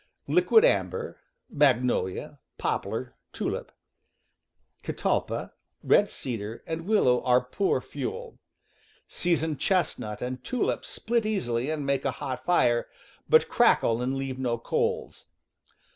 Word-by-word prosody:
Liquidambar, 460 +3 +3 0.3
magnolia, 125 - +1 0.2
pop - - -1
„, - - -7
lar - - -4 0.2
(tulip), - - -3 1.1
catalpa, - - -2 0.3
red - - +4
cedar, 115 -2 -5
and,,. 165 +2 -5
willow 130 - +3
are 125 0 +5
poor 130 +11 0
fuel. 470 +1 -6 0.7
Seasoned 160 -4 -1
chest 185 -2 +1
nut 105 -1 -6
and 125 0 -5
tulip 250 - -1
split 235 0 -1
easily 145 - -1
and 155 -2 -2
make 140 -1 0
a 135 - 0
hot 135 -3 -4
fire, 120 -9 +2 0.4
but - - +6
crackle 115 +1 +3
and 130 +2 -1
leave 135 -1 -4
no 120 -3 0
coals. 115 - -2
135 Hz, 120 wpm, -27 LUFS, 125-180 Hz, 1.1 s, but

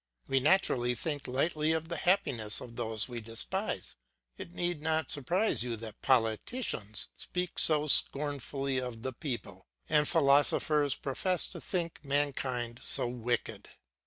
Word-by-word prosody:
We 135 0 +2
naturally 130 -6 +2
think 145 +2 -3
lightly 155 +4 +1
of 160 0 -2
the 170 - -2
happiness 120 - +1
of 115 -1 -9
those 110 -2 0
we 120 -2 -6
despise. 115 0 -3 0.4
It 170 - -9
need 175 -3 -2
not 160 -1 0
surprise 175 - +1
you 120 -1 -1
that 110 -1 -9
politicians 115 - 0
speak 180 -1 -4
so 150 -2 +4
scornfully 140 -2 +1
of 125 -3 -6
the 130 - -3
people, 130 -2 -6 0.2
and 150 -1 +3
philosophers 145 -1 +3
profess 180 +6 -1
to - - -8
think 170 -4 -3
mankind 130 -4 -1
so - - +3
wicked. 120 -1 -3
140 Hz, 135 wpm, -31 LUFS, 120-160 Hz, 0.4 s, so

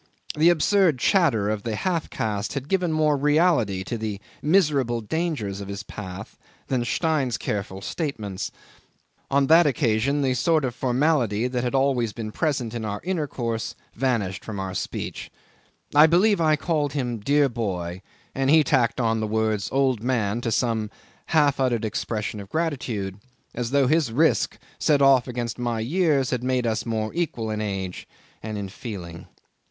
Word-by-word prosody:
The 160 +3 +5
absurd 175 -1 +3
chatter 130 - +2
of 105 -1 -1
the 110 0 -3
half 170 - -1
caste 105 -1 -2
had 140 -1 -4
given 180 -1 +1
more 155 -1 +2
reality 145 - +2
to 115 +3 -4
the 105 -2 -3 0.2
miserable 145 -8 +2
dangers 110 - -2
of 100 - -7
his 100 0 -5
path 95 -1 -8 0.3
than 130 -3 +1
Stein's 140 -3 0
careful 100 -2 -4
statements. 110 - -4 0.8
On 140 0 +3
that 165 +3 +6
occasion 140 0 +1
the 130 -1 +2
sort 155 +3 +2
of 125 - -2
formality 125 -4 +1
that 125 -1 -2
had 125 - -1
been 135 - +3
always 125 -5 +1
present 120 +2 -2
in 115 -2 -4
our 105 -1 -3
intercourse 135 -10 -2 0.2
vanished 110 -7 -1
from 105 -3 -6
our 95 -1 -4
speech; - - -4 0.6
I 150 +2 +8
believe 185 +4 +3
I 155 -1 +4
called 150 -2 -1
him 125 -5 -2
"dear 140 +6 +3
boy," 95 -7 -3 0.3
and 135 0 0
he 155 +1 +6
tacked 125 -4 +1
on 115 -2 +1
the 110 - -1
words 110 -2 0
"old 130 -4 +1
man" 115 -3 0
to 115 - -2
some 110 -3 0 0.4
half 145 -4 +3
uttered 120 -4 +1
expression 105 0 -3
of 100 -1 -9
gratitude, 120 - -2 0.3
as 120 -1 -3
though 140 +1 +3
his 150 -2 +2
risk 155 +8 +2 0.2
set 150 -3 +3
off 135 -2 +5
against 120 -2 -4
my 120 -2 -1
years 140 +1 +1
had 125 -2 -1
made 125 -1 0
us 110 0 -1
more 110 -1 -2
equal 130 -10 -2
in 105 0 -2
age 95 -3 -4 0.3
and 110 -1 -5
in 100 -1 -4
feeling. 95 -5 -8
125 Hz, 165 wpm, -24 LUFS, 110-150 Hz, 0.8 s, I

